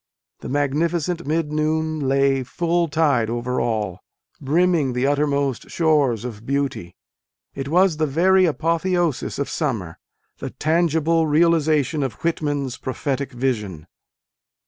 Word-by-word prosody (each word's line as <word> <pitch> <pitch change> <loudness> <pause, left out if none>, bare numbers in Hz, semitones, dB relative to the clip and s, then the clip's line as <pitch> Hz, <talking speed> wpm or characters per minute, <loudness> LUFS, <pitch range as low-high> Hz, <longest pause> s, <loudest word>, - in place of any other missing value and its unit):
The - - -7
magnificent 160 +5 -1
mid 155 0 0
noon 155 +1 0
lay 135 -1 +2
full 170 +6 0
tide 145 -7 +1
over 120 +2 -2
all, 110 -6 -2 0.4
brimming 155 -1 +2
the 125 +2 0
uttermost 140 -2 0
shores 145 -9 +1
of 115 -3 -7
beauty: 135 -9 -2 0.6
it 135 0 -5
was 175 +1 +3
the 155 0 +1
very 185 +6 +4
apotheosis 170 -1 0
of 140 - -2
summer, 110 - -3 0.4
the - - -5
tangible 165 0 +1
realization 155 -2 +2
of 135 -3 -2
Whitman 145 -4 -1
s 125 - -6
prophetic 135 +1 -3
vision. 105 - -3
145 Hz, 125 wpm, -22 LUFS, 130-165 Hz, 0.6 s, very